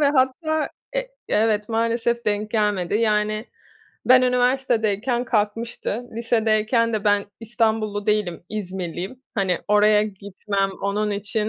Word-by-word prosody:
ve 285 -1 +4
hatta, 300 +3 +1 0.3
e - - -1 0.2
evet, 210 -1 +1
maalesef 230 +1 0
denk 210 0 0
gelmedi. 205 -5 0
Yani, 215 0 +1 0.6
ben, 255 0 +7
üniversitedeyken 245 -2 +1
kalkmıştı. 225 +1 -2
Lisedeyken 230 0 +1
de 215 -1 -2
ben 205 -1 +3 0.2
İstanbullu 220 -2 -1
değilim, 210 -6 0
İzmirliyim. 190 +2 -5
Hani, 190 -4 0
oraya 210 0 +5
gitmem, 200 0 -3
onun 210 +1 0
için 210 +1 -2
215 Hz, 115 wpm, -23 LUFS, 205-235 Hz, 0.6 s, ben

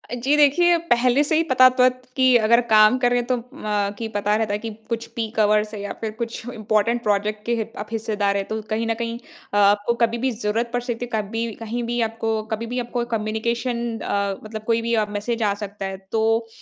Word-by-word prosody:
जी, 260 +4 +1
देखिए, 340 +4 +5
पहले 245 +3 +4
से 305 +2 0
ही 325 - +3
पता 255 -4 +6
तो 255 0 +2
है 255 - +7 0.3
कि 260 -1 +4
अगर 235 +1 +4
काम 215 +3 +6
करें, 245 -1 +2
तो 255 - +2
अ, 210 -4 -3
कि 225 - -4
पता 210 -1 0
रहता 215 -1 0
है 205 - -1
कि 225 +1 -5 0.2
कुछ 230 -1 -2
पीक 225 -1 -3
आवर्स 210 0 +2
है 210 - -5
या 205 - -4
फिर 220 -1 -2
कुछ 230 0 -4
इम्पोर्टेंट 215 +2 0
प्रोजेक्ट 210 0 0
के 235 - +1
हिप 225 0 -4
आप 210 - -5
हिस्सेदार 210 -3 0
हैं, 195 - -2
तो 220 0 -3
कहीं 225 +1 -1
न 225 - +1
कहीं 230 0 -4 0.4
अ, - - +1
आपको 205 +3 +4
कभी 230 +1 -4
भी 260 +2 0
ज़रूरत 225 +1 -2
पड़ 245 - 0
सकती 245 -1 -3
है, 225 -3 -1
कभी 225 +3 -3
कहीं 230 +2 -4
भी 240 +1 -2
आपको 225 -1 -2
कभी 225 +2 -6
भी 245 +2 -3
आपको 240 0 -2
कम्युनिकेशन 235 +2 -2
अ, 200 -1 -1
मतलब 215 0 -7
कोई 230 0 +1
भी 235 +1 -1
अ, 215 -1 +2
मैसेज 220 +3 -2
आ 205 -1 +2
सकता 200 0 -7
है, 195 0 -4
तो 225 +1 +1
225 Hz, 230 wpm, -22 LUFS, 215-240 Hz, 0.4 s, है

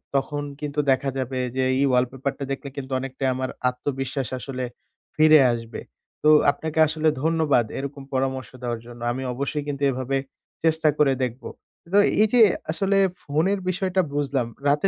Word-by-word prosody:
তখন 145 +2 -1 0.2
কিন্তু 150 0 -3
দেখা 135 +1 +1
যাবে 130 0 -2 0.2
যে - - +2 0.2
এই 140 - +3
wallpaper-টা 135 +2 -1
দেখলে 135 0 -4
কিন্তু 135 -1 -6
অনেকটাই 135 0 -2
আমার 130 0 -2 0.2
আত্মবিশ্বাস 135 0 -3
আসলে 130 -1 -5 0.5
ফিরে 155 0 +7
আসবে। 115 -1 -6 0.4
তো 150 - +5 0.2
আপনাকে 160 +2 -4
আসলে 155 0 +1
ধন্যবাদ 160 -7 +2
এরকম 140 0 -6
পরামর্শ 130 -2 -1
দেওয়ার 120 -2 -3
জন্য। 120 -1 -12
আমি 130 +2 -4
অবশ্যই 140 +3 -2
কিন্তু 140 -1 -3
এভাবে 130 +1 -1 0.5
চেষ্টা 160 -1 +2
করে 140 -3 +4
দেখব। 125 +1 -4 0.5
তো 200 - +5 0.2
এই 220 - +5
যে 245 - +6 0.3
আসলে 195 +3 +1 0.3
ফোনের 165 +8 +1
বিষয়টা 185 0 +1
বুঝলাম। 140 -4 0 0.2
রাতে 145 +7 +3
140 Hz, 155 wpm, -24 LUFS, 130-155 Hz, 0.5 s, ফিরে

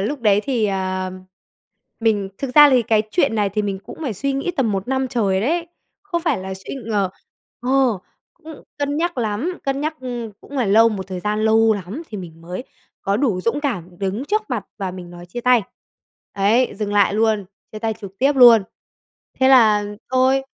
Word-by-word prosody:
lúc 260 +7 -2
đấy 205 -2 +4
thì, 240 -6 +1
ờ, 185 -1 -2 0.9
mình 210 -4 +1
thực 265 -2 -4
ra 295 -1 +9
thì 250 -2 +4
cái 220 -1 +2
chuyện 280 -10 +2
này 205 -2 +1
thì 210 +2 -1
mình 195 -2 -2
cũng - - -10
phải 255 -8 -2
suy 275 +8 -2
nghĩ 275 +6 -1
tầm 230 -6 +1
1 195 +3 -3
năm 265 0 0
trời 200 -7 +1
đấy, 335 - 0 0.4
không 345 -4 -3
phải 320 -6 +1
là 190 0 -5
suy 190 +7 -8
ngờ 200 -4 0 0.5
ờ, 255 -4 +2 0.4
cũng 320 -2 -12 0.2
cân 285 0 -1
nhắc 340 -3 -1
lắm, 240 - -2
cân 275 0 -1
nhắc, 310 +1 -2
ừm, 240 -4 -5
cũng 285 - -10
phải 240 -6 +1
lâu, 225 +3 +6
một 195 -4 -4
thời 185 -2 -5
gian 210 +2 -1
lâu 220 0 +4
lắm 205 - -6
thì 210 - -6
mình 165 -3 -10
mới 180 +8 -6 0.4
có 200 +1 +1
đủ 225 -8 0
dũng 230 +9 -1
cảm 180 - -4
đứng 200 +6 -2
trước 430 +6 0
mặt 230 -6 -2
và 190 -2 -3
mình 180 -1 -9
nói 175 0 -11
chia 210 +8 -6
tay, 245 -2 +4 0.7
ấy, 215 +6 +2
dừng 205 0 -3
lại 205 -1 +3
luôn, 215 -2 +1 0.3
chia 215 - -6
tay 220 0 -2
trực 195 -2 -10
tiếp 275 +2 +3
luôn. 235 -4 +8 0.8
Thế 260 - +5
là 215 -5 +6 0.3
thôi. 260 +1 +3
225 Hz, 205 wpm, -20 LUFS, 195-265 Hz, 0.9 s, ra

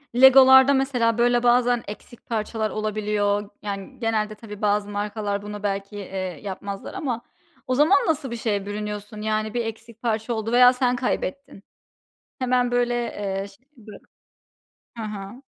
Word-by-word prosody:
Lego'larda 265 +1 +8
mesela, 250 -4 +1
böyle 240 0 +3
bazen 245 0 +3
eksik 215 +3 -10
parçalar 220 -1 -2
olabiliyor. 210 -1 -1
Yani, 200 -2 -6
genelde 215 -2 -1
tabii 210 -1 -10
bazı 205 0 +1
markalar 205 0 -3
bunu 210 0 -8
belki, 200 0 -3
eee, 190 -3 -5
yapmazlar 200 0 -6
ama 265 -11 -3 0.5
o 255 - +1
zaman 315 +8 +4
nasıl 275 -6 -1
bir 235 - -4
şeye 205 -3 -1
bürünüyorsun? 210 0 -5
Yani 215 0 -1
bir 240 -1 -1
eksik 225 +1 -8
parça 225 0 -1
oldu 220 0 -3
veya 250 +1 +7
sen 250 -1 +1
kaybettin. 255 -3 -3 0.8
Hemen 250 -1 +1
böyle, 245 0 +1
eee, 200 -5 -3
ş 195 - -18 0.2
bö 215 -2 -13 1.0
Ha 215 -2 -5
ha. 200 +6 -8
220 Hz, 145 wpm, -24 LUFS, 205-245 Hz, 1.0 s, Lego'larda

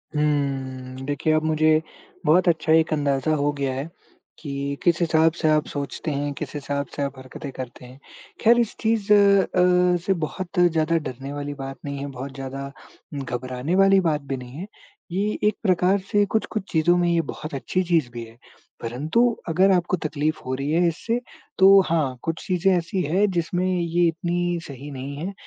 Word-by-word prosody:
हम्म, 135 -3 -2
देखिए, 145 +2 0
अब 155 0 +2
मुझे 155 0 +3 0.4
बहुत 180 +3 +4
अच्छा 160 -1 +2
एक 160 0 +4
अंदाज़ा 145 0 +1
हो 145 0 +1
गया 135 -2 -1
है, 135 +5 -4 0.5
कि 140 -1 -4
किस 170 -2 +3
हिसाब 160 -1 +4
से 160 - +2
आप 155 0 +3
सोचते 145 +2 -4
हैं, 145 +1 -2
किस - - -6
हिसाब 140 0 -2
से - - -3
आप 140 -1 -4
हरकतें 130 +2 -8
करते 125 -1 -8
हैं। 130 +2 -14 0.4
खैर 235 +2 +5
इस 235 -3 0
चीज़ 220 -2 0
अ, 180 -3 +4
से 195 - +3
बहुत 185 +3 -5
ज़्यादा 165 -2 +3
डरने 135 -2 -6
वाली 145 0 -4
बात 135 0 -6
नहीं 140 0 -4
है, 140 - -4
बहुत 135 +1 -7
ज़्यादा 135 +1 -6 0.5
घबराने 130 +6 -3
वाली 195 0 +5
बात 150 -1 -1
भी 135 - -1
नहीं 125 0 -10
है, 190 - -6 0.4
ये 195 +3 0 0.2
एक 210 0 +3
प्रकार 185 0 +3
से 205 0 +4
कुछ-कुछ 215 -2 -1
चीज़ों 175 +2 +3
में 175 -1 +2
ये 170 -1 +3
बहुत 155 - -8
अच्छी 180 +7 -1
चीज़ 170 -7 +1
भी 120 -1 -6
है, 115 +1 -14 0.4
परंतु 140 - 0 0.3
अगर 185 +4 +4
आपको 180 0 +2
तकलीफ़ 155 +1 -1
हो 130 - -2
रही 140 +2 -3
है 170 +2 +3
इससे 225 +8 -1 0.4
तो 195 +1 +8
हाँ, 155 -6 0
कुछ 165 0 -3
चीज़ें 185 +1 +2
ऐसी 175 +2 -1
हैं 180 +8 +2
जिसमें 175 +1 -1
ये 175 -1 +1
इतनी 175 +1 -1
सही 140 +1 -9
नहीं 135 +1 -6
है। 180 +7 -4
155 Hz, 185 wpm, -23 LUFS, 140-180 Hz, 0.5 s, तो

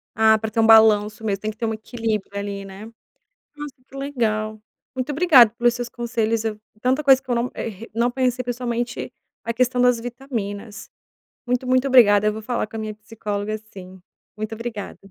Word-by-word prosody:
Ah, 220 0 +5
para 220 0 -5
ter 225 - -2
um 225 - +5
balanço 220 -1 +5
mesmo, 200 -2 -2
tem 215 - -2
que 210 - -18
ter 235 - -2
um 220 - -1
equilíbrio 220 -3 -4
ali, 200 -1 -5
né. 195 +2 -10 0.7
Nossa, 295 -2 -7
que 275 - -15
legal. 220 -6 -2 0.3
Muito 260 +3 -2
obrigado 285 -8 +6
pelos 240 0 +2
seus 245 0 -5
conselhos. 230 -2 -1
É 220 - -1 0.3
tanta 260 +4 +1
coisa 270 -2 +6
que - - -22
eu 245 - +1
não, 235 +2 -1
eh, 225 0 -6
não 235 +2 +1
pensei, 255 -1 0
pessoalmente 240 -1 -3 0.3
a 230 - -2
questão 250 +1 +1
das 245 -2 +4
vitaminas, 230 -5 -6 0.6
muito, 250 +1 0
muito 255 +1 +2
obrigada, 210 -5 +6
eu 215 - +1
vou 220 - -6
falar 235 0 -2
com 220 - -12
a - - -3
minha 215 0 -4
psicóloga, 210 0 -4 0.2
sim. 185 -1 -11 0.4
Muito 215 +1 -4
obrigada. 225 -2 -6
225 Hz, 190 wpm, -22 LUFS, 215-245 Hz, 0.7 s, obrigado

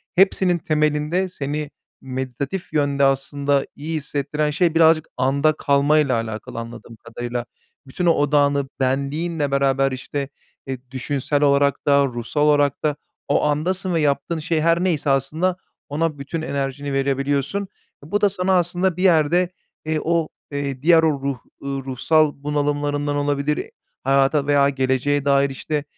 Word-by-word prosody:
hepsinin 190 -1 +3
temelinde 155 +3 0
seni 150 -3 -4 0.3
méditatif 130 +6 -4
yönde 145 -2 +1
aslında 140 +1 +1
iyi 160 +3 -5
hissettiren 150 0 -2
şey 165 +1 +1
birazcık 160 -1 +4
anda 140 +4 +2
kalmayla 140 -1 +2
alakalı 115 0 -4
anladığım 115 0 -9
kadarıyla. 120 +2 -5 0.4
Bütün 175 +7 -3
o 170 - +6
odağını 145 -2 +2
benliğinle 140 +3 -1
beraber 135 0 +2
işte, 135 +2 -4 0.4
eee, 135 -1 -3
düşünsel 140 +2 -1
olarak 140 0 +2
da 140 0 +5
ruhsal 120 +3 -3
olarak 145 -2 +3
da, 150 -2 +1 0.3
o - - +2
andasın 175 +5 0
ve 165 - +1
yaptığın 145 +3 0
şey 155 +1 -1
her 170 +2 +2
neyse 160 -6 0
aslında 155 +7 +1 0.3
ona 150 +1 -1
bütün 155 +4 -4
enerjini 140 0 -3
verebiliyorsun. 140 +7 0 0.4
Bu 205 +8 -2
da 205 - +5
sana 190 0 0
aslında 175 +1 0
bir 185 - -1
yerde, 175 0 +3 0.4
eee, 155 0 0
o, 165 -1 +1 0.2
eee, 140 -2 -3
diğer 165 0 +5
o 160 - +4
ruh, 140 -1 -2 0.2
eee, 140 - -7
ruhsal 135 +3 +1
bunalımlarından 145 0 -1
olabilir, 145 +1 -1 0.3
hayata 135 +2 +2
veya 140 -1 +4
geleceğe 135 +1 0
dair 140 0 +3
işte 145 +2 -3
145 Hz, 140 wpm, -21 LUFS, 135-160 Hz, 0.4 s, o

